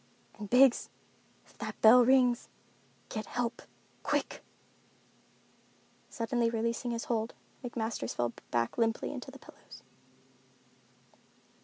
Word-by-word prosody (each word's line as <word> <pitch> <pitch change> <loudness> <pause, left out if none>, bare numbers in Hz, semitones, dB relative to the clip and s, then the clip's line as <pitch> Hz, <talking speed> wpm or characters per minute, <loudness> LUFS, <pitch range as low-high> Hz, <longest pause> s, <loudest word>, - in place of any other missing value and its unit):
And 210 -1 -6
Biggs—if 255 0 +1
that - - -6
bell 240 +3 +8
rings, 250 -1 +3 0.6
get 215 -2 -5
help—quick!" 240 -1 -4 1.7
Suddenly 230 0 0
releasing 230 +1 -2
his 235 -1 -2
hold, 225 -1 -2 0.3
McMasters 225 - -3
fell 120 -1 -1 0.2
back 120 - -1
limply 225 0 +1
among - - -5
the - - -10
pillows. - - -15
230 Hz, 95 wpm, -31 LUFS, 220-245 Hz, 1.7 s, bell